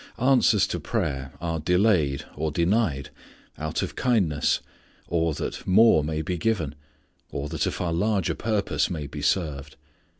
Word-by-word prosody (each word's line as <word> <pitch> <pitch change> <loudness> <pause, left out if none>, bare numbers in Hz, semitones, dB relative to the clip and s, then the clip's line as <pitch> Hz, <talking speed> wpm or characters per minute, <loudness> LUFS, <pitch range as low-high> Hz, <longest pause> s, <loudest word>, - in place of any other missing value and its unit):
Answers 125 -5 +4
to 85 - -2
prayer 75 - -2
are 85 -1 -2
delayed, 85 -5 +2
or 80 +2 -1
denied, 85 - 0 0.5
out 75 0 -2
of - - -5
kindness, 95 - +1 0.5
or, 80 -2 0
that - - -5
more 95 -4 +6
may 80 +1 -2
be 90 +2 -3
given, 85 -9 0 0.6
or, 70 - -4
that 80 0 -1
a - - 0
far 85 -2 -2
larger 100 +1 +1
purpose 100 -10 0
may 80 -5 -4
be 70 +1 -7
served. 75 -2 -1
80 Hz, 145 wpm, -25 LUFS, 75-100 Hz, 0.6 s, more